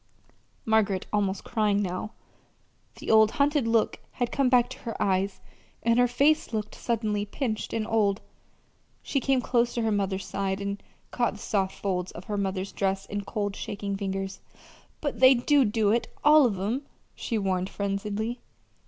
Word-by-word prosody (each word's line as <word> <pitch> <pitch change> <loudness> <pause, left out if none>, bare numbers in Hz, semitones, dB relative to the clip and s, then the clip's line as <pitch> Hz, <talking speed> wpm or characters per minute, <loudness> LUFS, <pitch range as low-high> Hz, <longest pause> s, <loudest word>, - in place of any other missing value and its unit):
Margaret 215 -4 +2
was - - -25
almost 200 -2 0
crying 210 -3 +1
now. 195 +2 -3 0.8
The - - -3
old 220 -1 +7
hunted 285 -3 +2
look 225 -1 +2
had 245 -2 -2
come 275 -2 +2
back 245 -1 +4
to - - -8
her 230 - -6
eyes, 195 0 0 0.4
and 230 +1 +3
her 245 - +5
face 280 +5 +2
looked 215 -1 -3
suddenly 215 -3 -1
pinched 220 +1 -3
and 225 -1 -1
old. 210 -2 +1 0.8
She 275 - 0
came 265 -1 +2
close 240 -1 +1
to 235 - 0
her 220 - +1
mother's 195 -2 -1
side 195 0 -2
and 200 0 -4 0.3
caught 240 -4 0
the 205 - -11
soft 195 -2 -1
folds 185 -2 -2
of 175 - -9
her 205 +2 -3
mother's 190 0 -2
dress 195 0 -1
in 205 0 -4
cold, 205 -2 -2
shaking 200 -1 -4
fingers. 195 -1 -3 0.6
"But 285 -6 -3
they 260 +1 +8
do 275 +2 +3
do 210 -1 +2
it 235 +2 +1 0.2
all 300 -2 +7
of 200 -5 -3
'em," 235 +9 -2 0.3
she 230 - -3
warned 190 -2 -1
frenziedly. 210 +4 -3
210 Hz, 170 wpm, -27 LUFS, 195-240 Hz, 0.8 s, they